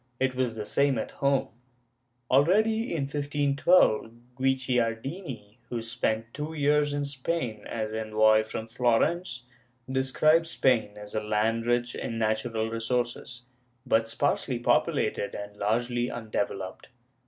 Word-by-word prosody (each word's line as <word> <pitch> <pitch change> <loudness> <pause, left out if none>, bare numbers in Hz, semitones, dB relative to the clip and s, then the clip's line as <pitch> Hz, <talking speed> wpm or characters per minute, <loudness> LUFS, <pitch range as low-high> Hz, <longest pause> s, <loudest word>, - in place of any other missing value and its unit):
It 130 0 +1
was 125 -3 -1
the 105 -1 -5
same 140 +1 +2
at - - -3
home. 140 -1 +1 0.8
Already, 215 - +3
in 160 -4 -1
1512, 145 -3 +2 0.2
Guicciardini, 130 - -2
who 120 -2 -3
spent 115 0 -2
two 155 +2 -5
years 145 0 +2
in 145 0 -1
Spain 130 -5 -3
as 110 -1 -3
envoy 110 0 +3
from 110 0 -5
Florence, 125 +5 0 0.4
describes 155 +5 +2
Spain 120 -9 +1
as 105 0 -10
a 110 - -1
land 110 +2 0
rich 120 0 +1
in 115 - -4
natural 110 0 -1
resources, 120 +1 -3 0.4
but 115 -3 +2
sparsely 135 0 0
populated 120 -3 +1
and 100 0 -7
largely 120 +4 0
undeveloped. 100 -4 -4
120 Hz, 120 wpm, -27 LUFS, 110-140 Hz, 0.8 s, Already